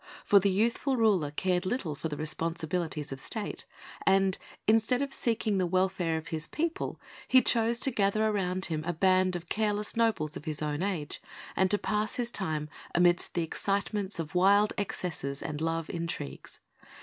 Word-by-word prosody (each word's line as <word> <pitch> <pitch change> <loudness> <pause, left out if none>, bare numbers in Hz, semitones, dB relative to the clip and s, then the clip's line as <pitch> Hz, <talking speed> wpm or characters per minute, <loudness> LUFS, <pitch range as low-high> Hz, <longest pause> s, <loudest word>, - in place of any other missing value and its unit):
For 200 - +7
the 200 +1 +2
youthful 235 +7 +1
ruler 200 -10 +3
cared 180 +4 0
little 185 - -2
for 145 - -4
the 150 -2 -5
responsibilities 160 0 -2
of 135 - -5
State, 210 +8 -4 0.4
and 195 -1 +3 0.3
instead 225 +4 +3
of 275 -1 -2
seeking 220 -4 0
the 180 - +1
welfare 185 -2 +1
of 160 - -7
his 160 0 -2
people, 330 +1 -2 0.3
he 260 - +7
chose 230 0 +3
to 270 - +5
gather 215 0 +2
around 185 -3 0
him 155 -2 -3
a 175 +2 -2
band 185 +1 +3
of 175 -1 -6
careless 210 0 -1
nobles 225 -10 +1
of - - -8
his 155 -2 -3
own 150 0 -2
age, 185 -7 -3 0.3
and 190 0 +3
to 205 - +3
pass 210 +2 -1
his 240 -1 -2
time 155 -8 -2 0.3
amidst 175 0 +3
the 170 - +1
excitements 200 +3 -2
of 165 +1 -5
wild 200 +3 +4
excesses 170 -9 -3
and 155 -1 -5
love 165 0 -1
intrigues. 165 - -5
185 Hz, 175 wpm, -29 LUFS, 160-210 Hz, 0.4 s, For